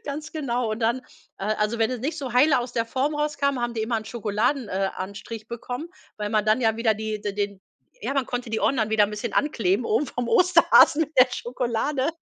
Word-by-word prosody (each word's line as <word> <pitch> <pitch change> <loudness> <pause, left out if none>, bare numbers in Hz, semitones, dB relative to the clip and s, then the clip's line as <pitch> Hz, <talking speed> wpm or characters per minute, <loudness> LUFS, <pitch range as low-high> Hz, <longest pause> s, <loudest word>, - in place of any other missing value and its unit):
Ganz 295 +2 -6
genau, 250 -7 -1
und 215 - -4
dann 235 +3 +1 0.4
äh, - - -5
also 215 +2 -1
wenn 225 +2 +2
es 250 - -4
nicht 300 +6 -3
so 260 -4 -5
heile 275 +3 +5
aus 245 0 -4
der 230 -1 -1
Form 270 +5 -1
rauskam, 295 -2 0
haben 240 0 -2
die 220 - -1
immer 230 +1 0
'n 220 - -4
Schokoladen 230 +3 -1
äh, 195 +1 -1
anstrich 210 +3 -7
bekommen, 245 +6 -6 0.3
weil 210 -1 -3
man 215 -1 +2
dann 215 +3 +3
ja 225 -2 +2
wieder 230 -1 +2
die 215 0 -4
d 205 -1 -3
den 200 -1 -3 0.4
ja, 275 - -3
man 275 -3 0
konnte 245 -1 -4
die 220 - -2
Ohren 275 - +2
dann 220 -1 0
wieder 210 -2 +4
bisschen 210 +2 -5
ankleben 225 -7 +1
oben 230 +7 +1
vom 245 -1 -4
Osterhasen 335 -3 +5
mit 310 0 -5
der 255 - +9
Schokolade, 250 +3 -1
235 Hz, 225 wpm, -24 LUFS, 215-270 Hz, 0.4 s, der